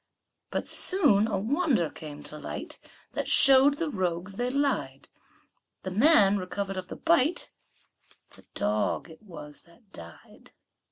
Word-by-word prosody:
But - - -3
soon 220 - +2
a 210 - -2
wonder 240 - 0
came 150 -2 -10
to 150 - -5
light, 145 - -6 0.3
That - - -3
showed 275 +1 +5
the 325 -2 -3
rogues 185 -2 -3
they 245 +1 -1
lied; 250 - -2 0.7
The 185 - -5
man 205 - +5
recover'd 195 +1 -4
of 185 -1 -6
the - - -8
bite, 330 0 +1 0.8
The - - -18
dog 105 +10 -2
it 160 - -16
was 150 -7 -12
that 200 +4 -25
died. 85 0 -14
195 Hz, 135 wpm, -27 LUFS, 165-270 Hz, 0.8 s, showed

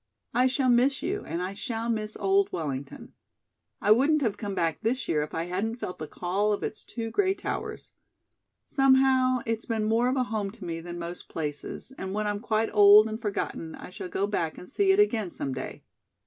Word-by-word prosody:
I 250 +2 +4
shall 260 0 +1
miss 260 +3 +3
you, 395 +4 -2
and 170 +2 -2
I 185 +2 -3
shall 225 +3 -4
miss 215 -2 -2
old 390 0 +2
Wellington. 140 -4 -5 0.7
I 210 - +2
wouldn't 285 +6 +4
have 220 -5 +1
come 200 -2 -5
back 165 -3 0
this 250 +4 -1
year 150 - +1
if 150 - -5
I 165 - -1
hadn't 190 +6 -2
felt 185 -6 -6
the 155 - -5
call 195 +6 0
of 205 - -3
its - - -4
two 225 -2 -5
gray 385 - +2
towers. - - -5 0.7
Somehow, 265 -2 +4
it's 225 0 -2
been 225 -2 0
more 225 +3 +2
of 260 - 0
a 255 - +2
home 215 -5 -2
to 225 -5 -10
me 165 -1 -3
than 175 +1 -7
most 170 +1 -7
places, 150 - -5
and 190 +1 -4
when 215 0 -1
I'm 205 0 -1
quite 220 0 0
old 210 +1 +8
and 220 +1 -5
forgotten 200 -6 -3
I - - -10
shall 185 - -7
go 195 - 0
back 170 -6 -2
and 180 - -10
see 390 +6 +3
it 385 - +3
again 225 - +3
some 135 -5 -4
day. 130 - -6
215 Hz, 210 wpm, -27 LUFS, 180-255 Hz, 0.7 s, old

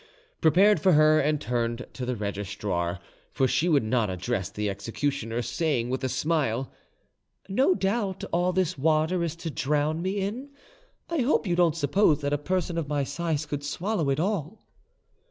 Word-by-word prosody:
] - - -38
prepared 190 +7 +5
for 190 -2 +4
her, 155 0 +5
and 150 +1 +1
turned 120 +1 -2
to 125 -2 -5
the 125 - -1
registrar—for 100 +1 -3
she 170 +6 +1
would 145 -7 +3
not 110 -1 +1
address 95 +1 -2
the 105 +1 -3
executioner—saying, 120 - -2
with 130 +1 -2
a 130 - 0
smile, 135 -2 0 0.8
"No 265 - +3
doubt 195 -1 -1
all 175 +1 +2
this 180 -4 0
water 160 +4 +2
is 165 -1 -2
to 165 -1 -5
drown 150 +4 0
me 190 +2 -1
in? 225 +9 -4 0.6
I 335 -1 -2
hope 255 -1 +2
you 175 -3 +1
don't 170 -2 +3
suppose 155 +1 +3
that 145 0 -1
a 145 - +1
person 175 +1 -1
of 155 - -4
my 145 -1 0
size 155 +1 -2
could 145 -1 -4
swallow 170 +1 -1
it 135 +1 +1
all." 190 0 -2
150 Hz, 170 wpm, -27 LUFS, 125-175 Hz, 0.8 s, prepared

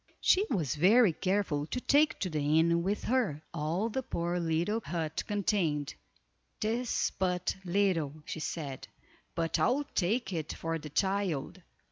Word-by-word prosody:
She 400 +3 +4
was 160 - 0
very 195 +5 +5
careful 185 -6 0
to 250 - -3
take 290 +4 +3
to 185 - 0
the 150 0 +1
inn 170 +1 +3
with 195 +4 -1
her, 210 - 0
all 170 +6 -1
the 250 +4 -2
poor 175 -6 -2
little 170 +7 0
hut 160 -2 -3
contained. 185 -8 0 0.7
"'Tis 230 +3 0
but 180 -1 0
little," 175 -6 +1
she 160 - -5
said, 145 -4 -5 0.5
"but 165 -1 0
I'll 270 +4 +2
take 195 +2 0
it 160 -3 -3
for 165 0 -3
the 150 0 -8
child." 190 -1 -1
175 Hz, 145 wpm, -31 LUFS, 160-205 Hz, 0.7 s, very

